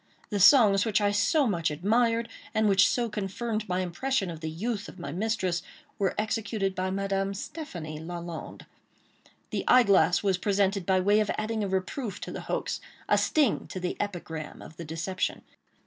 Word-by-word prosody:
The 205 - 0
songs 200 -2 +7
which 220 -2 +2
I 205 -1 +2
so 240 +9 +3
much 170 -8 +1
admired, 230 +8 +1 0.3
and 220 0 +3
which 195 -2 +5
so 240 -1 0
confirmed 215 +1 -3
my 180 +1 0
impression 190 +3 -1
of 165 - -8
the 160 0 -4
youth 205 +6 -3
of - - -13
my 170 -6 -6
mistress, 185 -2 -1 0.4
were 195 -2 +1
executed 215 -2 -1
by 185 0 -2
Madame 195 0 -1
Stéphanie 175 - -6
Lalande. 170 -1 -7 0.9
The - - -1
eyeglass 195 -9 +5
was 190 -3 +1
presented 195 -2 +1
by 190 -1 +4
way 205 +3 +4
of 215 - 0
adding 215 0 -1
a - - -1
reproof 190 +5 -3
to - - -5
the - - -5
hoax—a - - -2
sting 290 -8 +2
to 185 - -6
the 180 0 -2
epigram 165 -6 -5
of 160 - -12
the 170 - -7
deception. 165 +4 -3
195 Hz, 170 wpm, -28 LUFS, 180-215 Hz, 0.9 s, songs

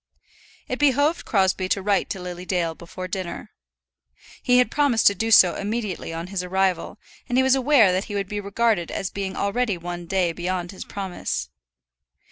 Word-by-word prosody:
It 255 - -3
behoved 290 +3 +2
Crosbie 190 -2 +1
to 195 - +1
write 200 0 +1
to 195 - -4
Lily 180 0 -7
Dale 175 -3 -1
before 185 +2 -8
dinner. 185 -1 -5 0.9
He 250 0 +3
had 250 - +3
promised 280 -6 +2
to 200 - +7
do 225 +2 -2
so 190 -5 +7
immediately 210 -4 -3
on 165 +1 -5
his 190 - -1
arrival, 190 +1 -1 0.3
and 245 - +1
he 260 - +5
was 265 0 +4
aware 265 -6 +5
that 185 +2 -1
he 205 - -6
would 200 -1 -2
be 205 +1 -4
regarded 200 -2 0
as 190 - -3
being 195 -1 -4
already 205 0 0
one 175 0 -6
day 180 -1 +1
beyond 175 +1 -3
his 190 - -9
promise. 185 - -4
195 Hz, 180 wpm, -23 LUFS, 180-225 Hz, 0.9 s, to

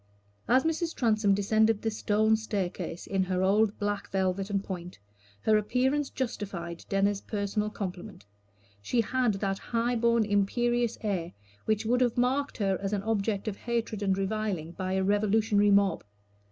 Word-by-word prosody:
As 255 +3 +4
Mrs. 325 +1 -1
Transome 215 -4 +2
descended 220 +2 +2
the 225 - 0
stone 215 +1 +2
staircase 195 -5 -3
in 195 -1 0
her 185 0 0
old 205 +2 +3
black 205 -1 -2
velvet 190 +1 -1
and 200 -1 -1
point, 180 -2 -7 0.4
her 215 -1 +4
appearance 265 +6 0
justified 195 -9 -5
Denner's 200 0 +1
personal 210 0 -2
compliment. 190 - -7 0.6
She 235 - +1
had 245 -1 +1
that 195 -1 -2
high 235 +1 -1
born, 235 -1 +3
imperious 235 +4 +1
air 185 -6 -2 0.3
which 220 0 0
would 245 +3 +2
have 245 -2 +1
marked 265 +4 +1
her 195 -3 0
as 195 +1 -2
an 200 -1 -1
object 215 -1 -1
of 210 - -2
hatred 230 -3 -2
and 195 -2 +1
reviling 195 -5 -2
by 185 +1 -3
a 190 0 +1
revolutionary 205 +1 +3
mob. 200 -3 +3
205 Hz, 155 wpm, -28 LUFS, 195-225 Hz, 0.6 s, As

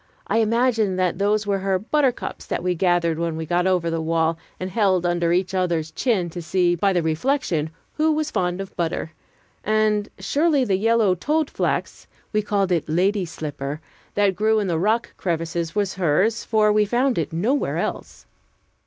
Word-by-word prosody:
I 225 - +1
imagined 225 -3 +2
that 180 -1 0
those 205 +1 +1
were 200 -1 0
her 190 0 +1
buttercups 260 +6 -1
that - - -2
we 180 0 +1
gathered 175 -2 +1
when 170 -1 -1
we 160 0 -4
got 175 +3 +1
over 180 -3 +1
the 165 0 -1
wall, 165 0 +1 0.2
and 185 0 -4
held 190 -5 +2
under 175 -1 +1
each 185 +2 +1
other's 170 -4 0
chin, 195 -1 0
to 175 - -6
see, 175 +2 +1
by 195 +3 +1
the 175 -3 +1
reflection, 160 - 0 0.3
who 315 +1 +3
was 310 0 -1
fond 180 0 -1
of 195 - -9
butter; 165 -2 -2 0.5
and 215 -1 +1
surely 290 -3 +1
the 195 -4 +1
yellow 225 -1 +3
toadflax 300 - -1 0.3
(we 215 - +2
called 200 -2 0
it 165 -3 0
"lady's 185 +2 +1
slipper") 145 -1 -5 0.4
that 200 -2 +2
grew 220 +2 +2
in 210 - +1
the 170 -4 0
rock 220 +6 0
crevices 165 -1 -2
was 200 -2 0
hers, 190 +5 +1
for 215 -2 +3
we 210 0 +4
found 245 +2 +1
it 160 - -2
nowhere 220 - 0
else. - - -4
190 Hz, 180 wpm, -22 LUFS, 170-215 Hz, 0.5 s, we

